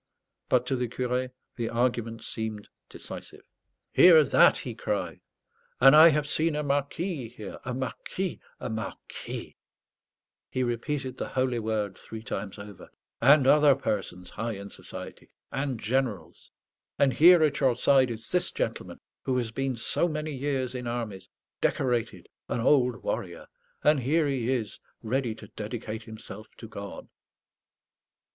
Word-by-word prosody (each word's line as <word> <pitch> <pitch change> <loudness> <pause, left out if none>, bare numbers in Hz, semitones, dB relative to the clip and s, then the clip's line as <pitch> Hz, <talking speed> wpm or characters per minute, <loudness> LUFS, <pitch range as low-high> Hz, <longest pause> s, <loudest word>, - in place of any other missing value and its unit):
But 125 -1 +3
to 130 - 0
the 125 -1 -1
curé 125 +1 -2 0.3
the 115 -2 -2
argument 115 -1 -1
seemed 110 -2 -5 0.2
decisive. - - -10 0.5
"Hear 165 -4 +8
that!" 140 - +5
he - - -5
cried. - - -3 0.6
"And 135 +3 +8
I 160 +2 +10
have 150 -1 +1
seen 155 +1 0
a 150 - -1
marquis 145 - -2
here, 105 -3 -9
a 125 0 -4
marquis, 130 - -4 0.2
a - - -4
marquis" 110 0 -6 0.9
he 130 - -1
repeated 130 +2 -2
the - - -3
holy 130 -2 0
word 105 -3 -2
three 110 0 -9
times 105 -3 -5
over 100 -2 -11 0.3
"and 140 -1 +6
other 145 0 +6
persons 90 -3 -3
high 115 +1 -3
in 100 0 -8
society; - - -9 0.2
and 135 -3 -2
generals. 120 -2 -2 0.5
And 135 -2 +3
here, 170 +5 +7
at 145 -2 +2
your 130 -4 +3
side, 130 +1 +4
is 115 -1 -6
this 180 0 +1
gentleman, - - -4 0.2
who 130 -1 0
has 120 -3 -1
been 135 +1 -2
so 120 +8 0
many 155 -1 -3
years 130 -2 -2
in 125 -1 -5
armies 115 -5 -4 0.3
decorated, 115 -7 0 0.2
an - - -1
old 125 -1 +3
warrior. - - -3 0.4
And 150 -1 +5
here 150 +6 +2
he 130 -4 -1
is, 115 -5 -2 0.2
ready 120 0 -1
to 105 - -12
dedicate 110 0 -5
himself 110 -1 -10
to 115 - -9
God." 100 -2 -8
125 Hz, 145 wpm, -28 LUFS, 110-140 Hz, 0.9 s, I